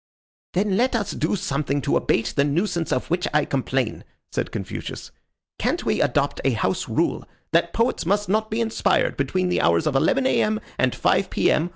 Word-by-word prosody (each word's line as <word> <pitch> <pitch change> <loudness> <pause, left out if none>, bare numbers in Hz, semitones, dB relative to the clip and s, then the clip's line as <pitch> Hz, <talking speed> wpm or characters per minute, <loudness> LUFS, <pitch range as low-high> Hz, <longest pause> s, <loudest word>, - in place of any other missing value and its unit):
"Then 195 +1 +1
let 250 +2 +2
us 205 -3 -1
do 160 +5 -1
something 145 -5 -1
to 140 - 0
abate 115 - +1
the 140 - +4
nuisance 170 +3 0
of 130 - -1
which 175 +1 +1
I 150 - +4
complain," 130 -3 -1 0.3
said - - -2
Confucius. - - -6 0.5
"Can't - - -1
we - - +1
adopt - - +1
a - - +2
house - - -1
rule - - 0 0.3
that 170 +1 +2
poets 230 +2 0
must 205 +2 +1
not 215 +3 +1
be 220 +2 -1
inspired 225 -1 +1
between 185 -1 0
the 180 - +1
hours 85 0 +3
of 145 - 0
11 260 - +2
A.M. 215 -4 +2 0.2
and 130 -1 +2
5 - - +2
P.M. 165 +3 +2
175 Hz, 185 wpm, -23 LUFS, 140-215 Hz, 0.5 s, the